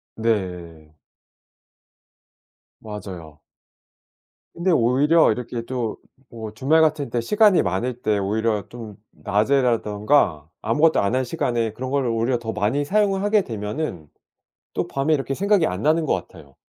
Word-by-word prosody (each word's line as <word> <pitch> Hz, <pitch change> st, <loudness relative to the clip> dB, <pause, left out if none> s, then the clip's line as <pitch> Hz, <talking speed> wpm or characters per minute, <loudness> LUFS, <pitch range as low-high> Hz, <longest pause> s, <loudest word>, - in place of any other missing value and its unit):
네. 90 Hz, -8 st, -3 dB, 1.9 s
맞아요. 90 Hz, -8 st, -9 dB, 1.1 s
근데 175 Hz, +2 st, 0 dB
오히려 140 Hz, +4 st, +4 dB
이렇게 120 Hz, 0 st, -5 dB
또 120 Hz, -3 st, -3 dB, 0.4 s
뭐 110 Hz, -2 st, -7 dB
주말 150 Hz, +7 st, +3 dB
같은 155 Hz, -5 st, +1 dB
때 120 Hz, -, 0 dB
시간이 210 Hz, -, +4 dB
많을 115 Hz, +7 st, -2 dB
때 105 Hz, -1 st, +1 dB
오히려 105 Hz, +1 st, 0 dB
좀 115 Hz, -4 st, -10 dB
낮에라든가 105 Hz, -, +1 dB
아무것도 150 Hz, +8 st, +3 dB
안 100 Hz, +6 st, 0 dB
한 130 Hz, -, +1 dB
시간에 120 Hz, -6 st, -1 dB
그런 130 Hz, +3 st, -6 dB
거를 135 Hz, -3 st, 0 dB
오히려 115 Hz, +2 st, 0 dB
더 115 Hz, -1 st, -5 dB
많이 135 Hz, +9 st, 0 dB
사용을 195 Hz, +2 st, +1 dB
하게 205 Hz, 0 st, +3 dB
되면은 105 Hz, -, -5 dB, 0.7 s
또 -, -, -1 dB
밤에 140 Hz, +3 st, +1 dB
이렇게 135 Hz, -1 st, -3 dB
생각이 200 Hz, 0 st, +2 dB
안 90 Hz, -4 st, -3 dB
나는 155 Hz, +1 st, +2 dB
것 -, -, +1 dB
같아요. 70 Hz, -2 st, -7 dB
120 Hz, 275 characters per minute, -22 LUFS, 105-145 Hz, 1.9 s, 오히려